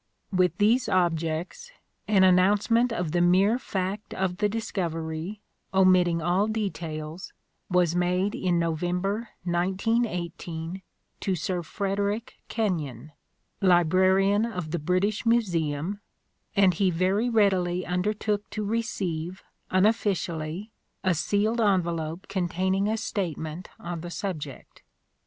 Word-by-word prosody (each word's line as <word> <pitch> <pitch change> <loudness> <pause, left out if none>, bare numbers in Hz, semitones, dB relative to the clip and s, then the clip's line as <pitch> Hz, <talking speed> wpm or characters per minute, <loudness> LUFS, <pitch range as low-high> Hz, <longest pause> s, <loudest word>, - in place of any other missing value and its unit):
With 180 -3 +2
these 225 +5 +3
objects, 170 - 0 0.4
an 200 -3 +4
announcement 205 +6 +4
of 175 -8 -2
the 175 +1 +2
mere 190 +7 +4
fact 195 -3 -3
of 185 -1 -1
the 210 +1 +1
discovery, 175 -3 -3 0.3
omitting 180 -3 +4
all 180 +5 +2
details, 170 -6 -4 0.4
was 180 -2 +2
made 180 +3 +1
in 180 -2 0
November 180 +6 -1
1918 180 -2 -1 0.4
to 190 - 0
Sir 180 +2 -2
Frederick 200 +5 -2
Kenyon, 155 - -2 0.5
Librarian 190 +3 +4
of 180 -9 -4
the 175 - -1
British 185 +7 0
Museum, 180 -5 0 0.5
and 195 -2 +5
he 190 +3 +2
very 190 +7 +1
readily 185 -5 +2
undertook 205 +3 -1
to 215 -1 -3
receive, 190 -6 -2 0.3
unofficially, 185 -2 0 0.3
a 185 -2 +3
sealed 205 +7 +1
envelope 170 -4 0
containing 190 +1 0
a 220 +1 0
statement 175 -6 -4
on 170 -1 -5
the 175 - -6
subject. 160 -7 -6
185 Hz, 110 wpm, -27 LUFS, 170-205 Hz, 0.5 s, and